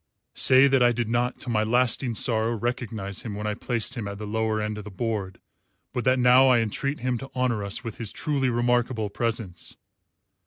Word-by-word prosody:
"Say 130 +1 +5
that 135 -2 +3
I 120 0 +5
did 120 -1 -2
not, 120 +2 0
to 125 - -6
my 110 -2 +2
lasting 120 +1 +1
sorrow, 115 +1 0
recognise 110 -4 -3
him 110 -4 -6
when 105 +1 -5
I 105 - 0
placed 115 +2 -2
him 115 -5 -4
at 100 0 -6
the 105 - -6
lower 110 +1 -1
end 105 0 -3
of - - -7
the 105 - -8
board, 100 -2 -3 0.5
but 125 -1 -3
that 130 0 +4
now 125 +1 +6
I 130 -2 +5
entreat 120 +5 -2
him 125 -1 -1
to 135 - -8
honour 125 -5 0
us 100 +7 -1
with 115 -3 -7
his 115 -3 -2
truly 140 -4 -1
remarkable 120 -2 0
presence. 110 -6 -4
115 Hz, 205 wpm, -25 LUFS, 105-125 Hz, 0.5 s, now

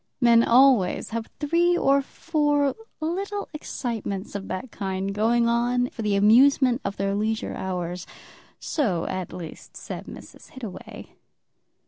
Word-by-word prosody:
Men 235 -2 +6
always 240 -7 +4
have 230 0 -3
three 340 +4 +2
or 275 -2 +3
four 290 -1 0 0.3
little 390 +6 -3
excitements 225 -9 -4
of 200 -1 -5
that 225 +6 -5
kind 195 0 -3
going 230 +3 +2
on 245 +1 +1
for 230 - -7
the 210 -2 +1
amusement 250 +5 +5
of 200 0 -4
their 195 0 0
leisure 220 +2 -1
hours, 180 -1 -4 0.5
so, 200 - -1
at 185 -2 -4
least, 165 -3 -9
said - - -7
Mrs. - - -12
Hittaway. 220 -8 -9
235 Hz, 130 wpm, -25 LUFS, 195-275 Hz, 0.5 s, Men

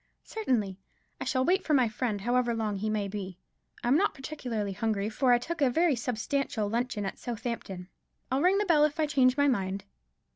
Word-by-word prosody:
"Certainly; 225 - -1 0.4
I - - -4
shall 260 -1 +1
wait 375 +2 +2
for 305 - +2
my 255 -3 +4
friend, 215 -2 -2
however 240 +1 +1
long 215 -3 -1
he 215 +3 -2
may 210 -2 -1
be. 195 -2 -6 0.5
I'm 245 +3 +3
not 395 +7 +2
particularly 245 -8 -4
hungry, 210 0 -1
for 250 +3 +2
I 245 - +7
took 325 +6 -5
a 275 - +5
very 320 +3 +3
substantial 240 -1 -1
luncheon 230 -1 -1
at 195 - -5
Southampton. 225 -6 -5 0.4
I'll 265 +2 +2
ring 370 +4 +4
the 415 - +1
bell 320 -5 +4
if 300 +1 +1
I 310 - +3
change 265 -3 +3
my 285 0 +4
mind." 195 -6 0
245 Hz, 195 wpm, -29 LUFS, 210-285 Hz, 0.5 s, I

